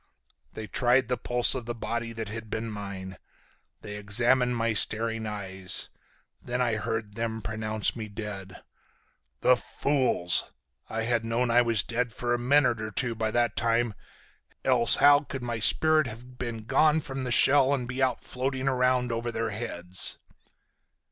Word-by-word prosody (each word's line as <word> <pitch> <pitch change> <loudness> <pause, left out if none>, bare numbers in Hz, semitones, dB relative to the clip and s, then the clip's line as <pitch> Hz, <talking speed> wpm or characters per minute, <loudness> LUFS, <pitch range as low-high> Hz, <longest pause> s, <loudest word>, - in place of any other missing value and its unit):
They 110 - -6
tried 125 +2 +2
the 125 - +1
pulse 120 +1 0
of 125 -3 -5
the 120 - -3
body 115 0 -4
that 115 -1 -5
had 110 0 -7
been 110 +1 -4
mine, 100 -2 -7 0.6
they 105 -1 -7
examined 120 +4 +2
my 115 -1 0
staring 110 +1 0
eyes. 95 -3 -2 0.5
Then 125 +1 -4
I 120 -3 +1
heard 110 -1 -4
them 110 0 -4
pronounce 110 0 -2
me 110 -2 -6
dead. 100 -3 -8 0.8
The 125 - +5
fools! 125 - 0 0.4
I 110 0 -2
had 120 0 0
known 115 +2 0
I 120 +1 +5
was 115 -3 +3
dead 120 0 -2
for 120 +1 -2
a 120 - 0
minute 125 -2 +2
or 110 - -4
two 120 +3 -1
by 110 -1 -2
that 120 0 0
time, 115 -1 +1 0.7
else 125 -3 +6
how 145 0 +6
could 135 -3 -7
my 120 -2 -3
spirit 155 +5 +4
have 125 +3 -11
been 115 -3 -5
gone 150 +6 +3
from 135 -2 -5
the 125 - -3
shell 135 +2 +6
and 130 -4 -1
be 130 +2 -4
out 130 -2 0
floating 130 +1 -3
around 125 -1 +1
over 115 +1 -3
their 115 -1 -2
heads?" 95 -4 -1
115 Hz, 165 wpm, -27 LUFS, 110-125 Hz, 0.8 s, else